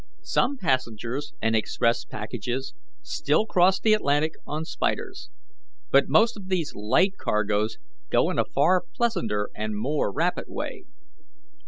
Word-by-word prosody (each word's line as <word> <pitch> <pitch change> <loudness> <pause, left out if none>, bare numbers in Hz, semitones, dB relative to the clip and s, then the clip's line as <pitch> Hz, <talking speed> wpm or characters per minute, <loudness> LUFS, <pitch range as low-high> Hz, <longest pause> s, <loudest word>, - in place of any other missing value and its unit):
Some 280 -8 +1
passengers 130 - -2
and 115 0 +2
express 115 +2 +1
packages 120 +4 -4 0.3
still 155 - +1
cross 185 -2 +3
the 220 - +4
Atlantic 155 -5 +2
on 155 +2 -3
'spiders,' 285 - -3 0.6
but - - +5
most 230 +2 +4
of 195 -3 -10
these 175 -5 -1
light 185 - +1
cargoes 105 +1 0 0.3
go - - +3
in - - -2
a - - +3
far 185 -1 +3
pleasanter 115 - 0
and 110 -1 -3
more 135 +1 0
rapid - - 0
way. - - -6
140 Hz, 135 wpm, -26 LUFS, -, 0.6 s, but